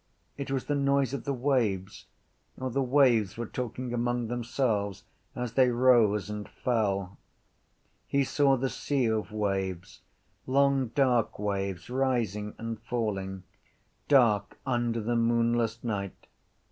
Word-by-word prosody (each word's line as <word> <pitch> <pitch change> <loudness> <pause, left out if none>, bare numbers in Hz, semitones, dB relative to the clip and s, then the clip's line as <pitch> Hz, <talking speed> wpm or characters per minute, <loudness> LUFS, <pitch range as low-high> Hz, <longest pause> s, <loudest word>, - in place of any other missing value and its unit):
It 140 -1 -5
was 135 -1 -1
the 145 - -1
noise 140 -1 +1
of 135 -4 -4
the 140 - 0
waves. 120 -8 -1 0.5
Or 130 0 -3
the 135 +3 0
waves 125 -7 +3
were 120 - -3
talking 125 +1 -5
among 120 -1 -1
themselves 115 -5 -1 0.3
as 125 -2 -4
they 130 0 +4
rose 120 -5 +4
and 105 -1 -6
fell. 100 -5 -1 0.9
He 140 0 +2
saw 135 0 +3
the 135 +2 0
sea 135 0 -1
of 110 -2 -1
waves, 95 -4 -3 0.5
long 135 0 +3
dark 125 -5 +2
waves 100 -4 -3
rising 115 -6 -1
and 115 -1 -5
falling, 100 -5 -3 0.6
dark 110 -8 +3
under 120 -3 0
the 120 +3 -1
moonless 115 0 +1
night. 100 -5 -4
120 Hz, 130 wpm, -28 LUFS, 105-130 Hz, 0.9 s, they